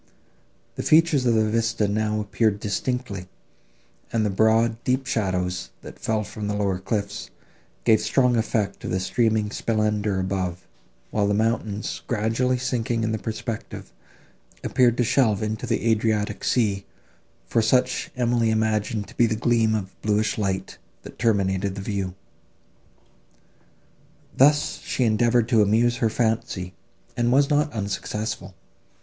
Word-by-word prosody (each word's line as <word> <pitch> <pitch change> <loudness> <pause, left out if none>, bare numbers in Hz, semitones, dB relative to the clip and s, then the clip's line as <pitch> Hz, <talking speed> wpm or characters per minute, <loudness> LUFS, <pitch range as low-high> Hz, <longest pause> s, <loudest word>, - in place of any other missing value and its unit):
The - - -1
features 155 -5 +4
of 115 - +3
the 110 -1 +3
vista 115 -1 +1
now 110 +1 0
appeared 105 0 0
distinctly, 105 -2 -3 0.8
and 110 -2 +1
the 105 - 0
broad 110 +3 +2
deep 130 +1 0
shadows, 90 -6 -1
that - - -11
fell 110 -1 -1
from 105 0 -6
the 105 - -1
lower 100 -3 0
cliffs, 100 +1 -3 0.5
gave 110 -2 +4
strong 125 -2 +2
effect 110 -3 -1
to - - -7
the 95 - 0
streaming 110 +1 +1
splendour 105 -3 0
above; 95 -1 -2 0.5
while 105 -2 +1
the 100 - +1
mountains, 110 -1 -1
gradually 115 +4 +1
sinking 120 -2 -1
in 110 - 0
the 110 - -2
perspective, 110 0 -6 0.7
appeared 120 -2 +3
to 125 - +3
shelve 115 -4 +2
into 110 0 -3
the - - 0
Adriatic 110 -1 0
sea, 100 -5 +1 0.6
for 115 - +1
such 125 +3 +1
Emily 120 -2 +1
imagined 110 -1 0
to - - -16
be 120 - +5
the 110 - -1
gleam 115 -1 +2
of 95 -3 -4
bluish 105 0 +1
light 95 -2 -2 0.2
that - - -12
terminated 100 -4 +1
the 100 - -5
view. 95 -2 -3 2.2
Thus 145 +2 +3
she 130 - -2
endeavoured 115 +1 +3
to 115 -4 +4
amuse 115 +4 +3
her 115 - +1
fancy, 110 -5 -1 0.4
and 120 0 +1
was 140 +2 +3
not 150 0 +2
unsuccessful. 105 -2 -4
110 Hz, 140 wpm, -24 LUFS, 100-120 Hz, 2.2 s, be